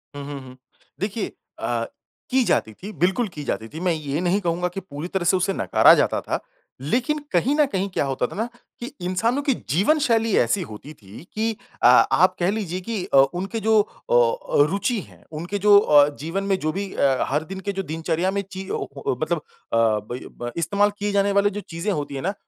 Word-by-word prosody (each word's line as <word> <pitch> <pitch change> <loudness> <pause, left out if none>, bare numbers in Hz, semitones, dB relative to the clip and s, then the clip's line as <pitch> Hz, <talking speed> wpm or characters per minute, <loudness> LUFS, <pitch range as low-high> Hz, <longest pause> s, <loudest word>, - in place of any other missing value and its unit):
हुँ, 145 - -6
हुँ, 140 -1 -6
हुँ। 130 0 -13 0.4
देखिए 210 +2 -2 0.3
अ, - - -1 0.4
की 260 0 +3
जाती 110 - 0
थी 195 - -9
बिल्कुल 190 +7 +2
की 150 - -6
जाती 110 -5 -3
थी। 160 - -6
मैं 180 0 +1
ये 150 0 -3
नहीं 180 +2 +2
कहूँगा 175 0 0
की 195 - -3
पूरी 155 -3 -7
तरह 180 -1 -2
से 185 +2 +4
उसे 190 +2 0
नकारा - - +5
जाता - - +1
था। - - -2 0.4
लेकिन 245 - 0
कहीं 190 - +2
न 300 -1 +4
कहीं 195 -7 -2
क्या 180 - -1
होता 135 -2 -1
था - - -10
ना 220 - -1 0.3
कि 240 - -5 0.2
इंसानों 225 +9 0
की 280 -2 +1 0.2
जीवनशैली 225 - +2
ऐसी 120 0 +2
होती 135 +8 -10
थी 105 -1 -13
की 220 +1 0 0.3
अ, - - +6
आप - - +5
कह 175 +1 +2
लीजिए 190 -4 -3
की 215 -5 -2
अ, 185 - +2 0.2
उनके 195 +6 -3
जो 220 -1 +5
अ, 120 - +1
रुचि 210 +4 0
है, - - -17
उनके 170 +6 -4
जो 205 -1 +9
अ, 145 -7 +6 0.2
जीवन 180 +5 -2
में 195 -1 +1
जो 155 - -1
भी 195 +2 -4
अ, 135 -1 +2
हर 150 +3 0
दिन 190 - -5
के 200 +1 -3
जो 195 0 -3
दिनचर्या 165 +3 0
में 200 0 -1
चीज़ 190 0 -6
ओ - - -2
ओ 135 - -1
मतलब 170 +2 0 0.4
अ, - - +3
ब 110 +1 +1 0.2
ब 120 0 -3
इस्तेमाल 200 +5 +2
किए 205 0 -1
जाने 200 0 +2
वाली 200 +1 +3
जो 205 +1 -5
चीज़ें 170 +5 -2
होती 145 -5 -3
है 135 - -4
ना 195 +6 -1
185 Hz, 215 wpm, -23 LUFS, 150-205 Hz, 0.4 s, जो